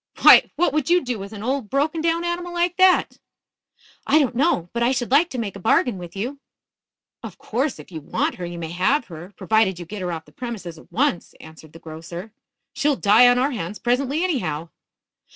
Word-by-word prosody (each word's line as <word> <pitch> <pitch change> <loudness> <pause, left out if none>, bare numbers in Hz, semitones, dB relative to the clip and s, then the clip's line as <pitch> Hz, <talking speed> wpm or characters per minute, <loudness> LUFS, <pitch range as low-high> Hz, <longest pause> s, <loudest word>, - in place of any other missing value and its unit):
"Why, - - +8
what 320 0 +2
could 305 -2 -1
you 355 0 +3
do 245 -4 -3
with 195 +1 -8
an 210 -1 -8
old, 260 -3 -2
broken 300 +5 0
down 335 +1 0
animal 350 0 -3
like 345 0 0
that?" 370 -1 +3 0.9
"I 305 - +4
don't 280 -5 +2
know. 240 - 0
But 235 - -2
I 240 +2 +3
should 245 -2 -3
like 310 +6 +4
to 260 - -6
make 215 -5 -4
a - - -8
bargain 220 +1 +1
with 175 0 -10
you 250 +8 -4 0.4
" - - -69
"Of - - -9
course 260 +4 -2
if - - -13
you 160 -2 -7
want - - -1
her 180 - -5
you 175 0 -7
may 165 -1 -6
have 230 - +1
her, 170 +4 -10
provided 220 -4 +1
you 175 - -8
get 205 +3 -7
her 180 -1 -3
off 160 -1 -6
the - - -20
premises 200 -10 -7
at - - -19
once," 260 -8 -1
answered 160 -1 -14
the - - -11
grocer. 170 +5 -9 0.4
"She'll 290 -1 +1
die 225 +2 +5
on 245 0 +4
our 265 +3 +1
hands 205 -4 -5
presently, 270 +6 0
anyhow." 170 - -2
235 Hz, 220 wpm, -22 LUFS, 180-285 Hz, 0.9 s, Why